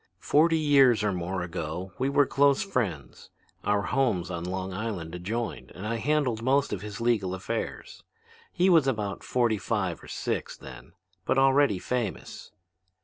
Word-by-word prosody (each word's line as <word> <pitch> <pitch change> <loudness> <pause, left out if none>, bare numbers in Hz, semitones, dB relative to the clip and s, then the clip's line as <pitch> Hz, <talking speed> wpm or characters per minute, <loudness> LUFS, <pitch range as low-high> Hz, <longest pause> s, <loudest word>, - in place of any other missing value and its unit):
Forty 160 +2 +3
years 140 -7 +4
or 105 - +1
more 90 +1 -3
ago 90 +1 -5
we 130 +2 +1
were 140 0 +4
close 140 +2 +3
friends. 110 - -3 0.3
Our 105 0 +1
homes 105 -7 0
on 85 -1 -4
Long 95 +1 -4
Island 95 -5 -4
adjoined 105 +6 -4
and 95 - -7
I 115 +2 -1
handled 135 -4 0
most 135 +3 +2
of 95 - -4
his 105 -1 -7
legal 110 -6 +1
affairs. 95 - -5 0.5
He 180 - +2
was 165 -7 +5
about 105 -6 -2
forty 120 -4 +1
five 95 -8 -2
or - - -13
six - - -3
then, - - -12 0.3
but 130 - 0
already 135 -5 +4
famous. 120 +1 -4
110 Hz, 155 wpm, -27 LUFS, 95-135 Hz, 0.5 s, was